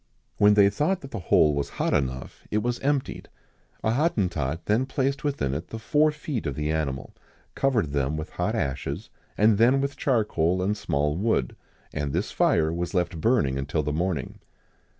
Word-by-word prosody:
When 105 0 +5
they 100 -1 +6
thought 160 - 0
that 135 - -10
the 115 - -4
hole 75 -1 +5
was 70 0 -2
hot - - 0
enough, 65 -2 -2
it 105 0 0
was 120 0 -1
emptied: 140 -1 -2 0.5
a 110 - +2
Hottentot 90 - 0
then 115 +5 +1
placed 135 0 -1
within 140 - -1
it 80 +5 -4
the 115 - -6
four 150 +7 +3
feet 150 - -4
of 70 - -3
the 75 +1 -1
animal, 70 -4 -3 0.4
covered 115 - +1
them 70 +1 0
with 80 - -6
hot - - -1
ashes, 70 +7 -3 0.3
and 105 0 +4
then 125 +4 +5
with 140 0 -2
charcoal 95 - +1
and 105 +3 +1
small 75 -7 -1
wood; 95 - 0 0.4
and 75 -2 -2
this - - -1
fire 80 0 +2
was 85 +2 -3
left 90 -2 -1
burning 75 - +2
until 75 +3 -1
the 75 +1 -2
morning. 85 -3 -2
95 Hz, 180 wpm, -26 LUFS, 75-120 Hz, 0.5 s, they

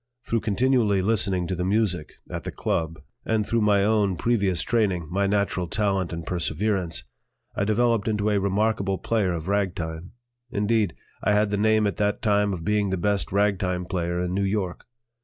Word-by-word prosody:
Through 115 - 0
continually 110 -2 +2
listening 95 -4 +2
to 95 - -3
the 90 - -2
music 95 -4 0
at - - -5
the - - -4
"Club," 80 0 -2 0.2
and 110 -2 0
through 115 +1 +1
my 100 -2 +3
own 105 -3 +2
previous 100 -5 +1
training, 95 -8 0
my 100 +2 +1
natural 100 -3 0
talent 95 -3 0
and 85 -1 -5
perseverance, 90 0 -1 0.5
I 100 - 0
developed 115 0 +2
into 105 -1 +1
a 100 - +2
remarkable 100 0 0
player 105 -4 0
of 85 -1 -4
ragtime; 90 -4 -2 0.4
indeed, 105 -3 +1 0.3
I 105 - +3
had 105 0 +2
the 105 - 0
name 110 +1 +3
at 100 -5 -1
that 105 0 0
time 105 -1 +2
of 85 -4 -5
being 105 -1 +1
the 95 - -1
best 100 +1 0
ragtime 95 -3 +1
player 85 -1 -2
in 90 0 -2
New 100 - 0
York. 95 -2 -2
100 Hz, 175 wpm, -25 LUFS, 90-105 Hz, 0.5 s, my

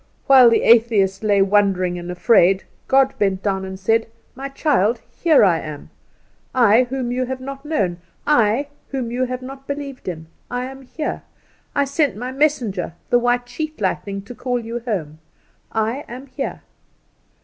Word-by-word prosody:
While 260 -3 +8
the 230 - +2
atheist 220 -5 +4
lay 205 -2 +3
wondering 190 -3 +2
and 175 0 -7
afraid, 185 0 +4 0.2
God 270 0 +4
bent 195 -2 +1
down 190 -2 0
and 190 0 -7
said: 225 +4 +1 0.3
"My 270 +2 -6
child, 245 - +1 0.2
here 320 -8 +5
I 170 -4 +3
am 150 -2 -8 0.6
I, 240 0 +5
whom 260 -2 -2
you 255 +1 0
have 260 +1 -4
not 275 +1 -7
known; 195 - -1 0.3
I, 260 0 +2 0.2
whom 255 -4 -3
you 255 +2 0
have 255 0 -5
not 270 +1 -10
believed 280 -4 -6
in; 160 -3 -5 0.2
I 245 0 -2
am 265 +1 -9
here. 300 +4 -4 0.5
I 285 - +3
sent 280 +1 0
My 250 +3 -4
messenger, 255 - 0 0.2
the 245 - +5
white 245 0 +1
sheet 310 +2 -5
lightning, 195 0 -2
to 225 - -9
call 245 +1 -2
you 230 +1 -5
home. 180 -11 -4 0.5
I 225 +6 -1
am 255 +3 -8
here." 270 0 -5
240 Hz, 165 wpm, -21 LUFS, 195-270 Hz, 0.6 s, While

